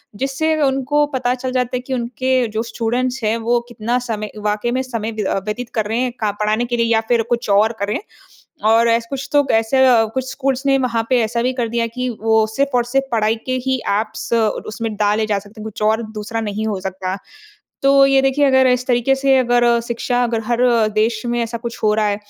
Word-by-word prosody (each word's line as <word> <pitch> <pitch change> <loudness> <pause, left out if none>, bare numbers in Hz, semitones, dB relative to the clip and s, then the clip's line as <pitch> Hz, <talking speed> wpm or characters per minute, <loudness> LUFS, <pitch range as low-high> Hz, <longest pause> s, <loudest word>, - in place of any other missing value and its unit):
जिससे 275 +6 0
उनको 275 +2 +2
पता 250 -1 +1
चल 255 0 -4
जाता 250 -1 -1
है - - -3
कि 260 +1 -5
उनके 255 +1 0
जो 220 +1 -2
स्टूडेंट्स 245 +2 -2
हैं 215 +1 +1
वो 235 +1 +1
कितना 235 +1 -1
समय 215 -1 -3
वाक़ई 210 +3 -1
में 260 +1 0
समय 230 -3 -4
व्य 215 -1 -3
अ, 190 - 0
व्यतीत 235 +3 -4
कर 220 -2 +1
रहे 225 +2 -1
हैं 250 -1 0
क 210 - +2
पढ़ाने 215 +3 +1
के 240 0 -2
लिए 230 - +2
या 225 - +3
फिर 235 -2 +3
कुछ 235 -3 -1
और 210 +3 +4
कर 200 - -1
रहे 210 - -1
हैं। - - -10 0.7
और 230 +1 +4
ऐस 230 0 +2
कुछ 275 -1 -4
तो 290 -1 +4
ऐसे 225 +4 +3
अ, 235 -3 +5
कुछ 260 0 -2
स्कूल्स 270 0 -2
ने 270 0 +4
वहाँ 235 -3 0
पे 250 -2 +4
ऐसा 235 +2 -1
भी 255 +1 +1
कर 240 -3 -2
दिया 230 0 0
कि 250 +2 -4
वो 220 -1 +3
सिर्फ़ 275 +5 0
और 240 - +2
सिर्फ़ 270 +3 0
पढ़ाई 220 0 +2
के 255 0 0
ही 260 0 +2
ऐप्स 215 +3 -2
और 220 -2 +1
उसमें 225 0 -4
डाले 210 +1 +1
जा 205 -2 0
सकते 210 +2 -14
हैं - - -7
कुछ 215 -1 -7
और 220 +2 +2
दूसरा 220 +2 -4
नहीं 215 +1 -3
हो 200 -3 -2
सकता। 190 0 -4 0.7
तो 275 0 +6
ये 270 0 +4
देखिए 270 +2 +2
अगर 265 -1 +4
इस 250 0 +1
तरीके 245 +2 +2
से 270 0 +3
अगर 240 -1 +3 0.2
शिक्षा 245 +1 -1
अगर 230 -1 -1
हर 240 +1 -1 0.3
देश 215 +1 +1
में 240 0 -1
ऐसा 230 0 -4
कुछ 235 0 -6
हो 210 -1 +3
रहा 215 -1 +1
है, 205 -1 0
235 Hz, 235 wpm, -19 LUFS, 220-255 Hz, 0.7 s, तो